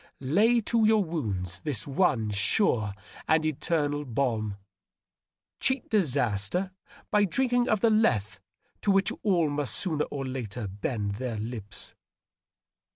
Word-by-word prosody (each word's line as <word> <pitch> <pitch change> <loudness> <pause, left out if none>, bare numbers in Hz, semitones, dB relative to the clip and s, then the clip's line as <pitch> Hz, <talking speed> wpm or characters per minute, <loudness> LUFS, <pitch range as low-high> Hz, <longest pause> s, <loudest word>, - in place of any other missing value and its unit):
Lay 225 +6 +5
to 230 +1 +1
your 215 -1 +4
wounds 100 - -3
the 145 -7 -2
one 135 - +1
sure 105 - +1 0.3
and 160 0 +3
eternal 150 -1 0
balm. 115 -6 -1 1.0
Cheat 260 -2 0
disaster 145 - +1 0.4
by 205 -1 +4
drink 245 +7 0
ing 245 0 +2
of 215 -3 +2
the 230 - +4
Lethe 110 - +2 0.4
to - - -1
which 195 0 +3
all 180 -6 +2
must 145 -2 0
sooner 155 -6 +1
or 135 -2 -5
later 120 -4 -4
bend 100 +1 -3
their 120 -2 -3
lips.' 105 -2 -5
145 Hz, 130 wpm, -28 LUFS, -, 1.0 s, Lay